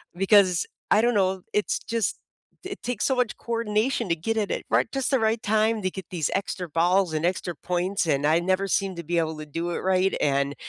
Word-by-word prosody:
Because 190 Hz, -2 st, +4 dB, 0.3 s
I 210 Hz, -, +6 dB
don't 240 Hz, +1 st, +2 dB
know, 190 Hz, -1 st, +1 dB
it's 210 Hz, -, 0 dB
just 230 Hz, -1 st, -2 dB, 0.5 s
it 390 Hz, +1 st, -6 dB
takes 240 Hz, -3 st, -2 dB
so 265 Hz, -, +2 dB
much 250 Hz, -3 st, 0 dB
coordination 230 Hz, +1 st, -1 dB
to 170 Hz, -, +1 dB
get 225 Hz, +8 st, -2 dB
it 210 Hz, -2 st, 0 dB
at -, -, -2 dB
right -, -, +2 dB
just 270 Hz, 0 st, -1 dB
the 265 Hz, -, +3 dB
right 220 Hz, 0 st, 0 dB
time 220 Hz, +1 st, +2 dB
to 185 Hz, -, 0 dB
get 190 Hz, -1 st, -8 dB
these 165 Hz, -6 st, -1 dB
extra 185 Hz, -2 st, -3 dB
balls, 175 Hz, +2 st, +2 dB
and 155 Hz, +1 st, -1 dB
extra 180 Hz, -1 st, -1 dB
points, 180 Hz, +4 st, -1 dB
and 145 Hz, -2 st, +1 dB
I 155 Hz, +2 st, +4 dB
never 185 Hz, +2 st, 0 dB
seemed 195 Hz, -1 st, 0 dB
to 170 Hz, -, -5 dB
be 170 Hz, +2 st, -1 dB
able 160 Hz, -1 st, -2 dB
to 155 Hz, -, -6 dB
do 165 Hz, +4 st, -4 dB
it -, -, -2 dB
right, 190 Hz, 0 st, +1 dB
and 140 Hz, 0 st, +1 dB
190 Hz, 225 wpm, -25 LUFS, 170-220 Hz, 0.5 s, I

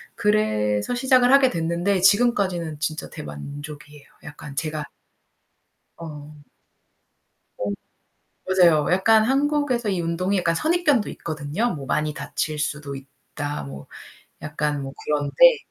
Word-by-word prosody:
그래서 105 Hz, -, +1 dB
시작을 255 Hz, 0 st, +4 dB
하게 275 Hz, -2 st, +6 dB
됐는데, 170 Hz, +2 st, 0 dB
지금까지는 190 Hz, -7 st, +2 dB
진짜 155 Hz, 0 st, -3 dB
대만족이에요. 145 Hz, -, -9 dB, 0.2 s
약간 150 Hz, -1 st, -10 dB
제가 155 Hz, +1 st, -3 dB, 1.1 s
어. 150 Hz, -2 st, -10 dB, 1.2 s
어. 100 Hz, -, -2 dB, 0.8 s
맞아요. 170 Hz, -6 st, +4 dB
약간 215 Hz, +4 st, +4 dB
한국에서 275 Hz, -3 st, +1 dB
이 185 Hz, -, -1 dB
운동이 180 Hz, +4 st, -1 dB
약간 170 Hz, -2 st, +1 dB
선입견도 310 Hz, -, +2 dB
있거든요. 160 Hz, +8 st, -3 dB
뭐 140 Hz, -2 st, -7 dB
많이 150 Hz, +1 st, -1 dB
다칠 155 Hz, -1 st, -3 dB
수도 150 Hz, -1 st, -3 dB
있다. 145 Hz, -, -7 dB
뭐 70 Hz, 0 st, -9 dB, 0.6 s
약간 150 Hz, -1 st, -2 dB
뭐 135 Hz, 0 st, -6 dB
그런데. 150 Hz, -, +4 dB
165 Hz, 265 characters per minute, -23 LUFS, 145-215 Hz, 1.2 s, 하게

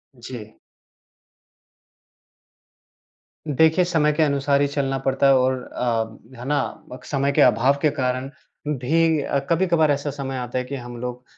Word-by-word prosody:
जी। 115 Hz, -3 st, -10 dB, 2.9 s
देखिए, 160 Hz, +5 st, +3 dB
समय 160 Hz, -4 st, +2 dB
के 155 Hz, +1 st, +2 dB
अनुसार 140 Hz, -1 st, +1 dB
ही 145 Hz, -, +3 dB
चलना 140 Hz, -1 st, -1 dB
पड़ता 135 Hz, +1 st, +1 dB
है 135 Hz, -, +6 dB
और 130 Hz, +1 st, +2 dB
अ, 115 Hz, -3 st, -2 dB, 0.2 s
है 125 Hz, -, -7 dB
ना? 145 Hz, 0 st, +2 dB, 0.3 s
बक 125 Hz, -, -10 dB
समय 140 Hz, 0 st, 0 dB
के -, -, +2 dB
अभाव 125 Hz, +4 st, +4 dB
के 155 Hz, -, +4 dB
कारण 130 Hz, +1 st, -1 dB, 0.5 s
भी 160 Hz, +4 st, +2 dB
अ, 140 Hz, -, -1 dB
कभी-कभार 170 Hz, -3 st, +3 dB
ऐसा 145 Hz, +1 st, -1 dB
समय 135 Hz, -1 st, -5 dB
आता 125 Hz, 0 st, -4 dB
है 125 Hz, -, 0 dB
कि 140 Hz, -, -5 dB
हम 120 Hz, -2 st, -8 dB
लोग 125 Hz, 0 st, -5 dB
135 Hz, 155 wpm, -22 LUFS, 125-150 Hz, 2.9 s, है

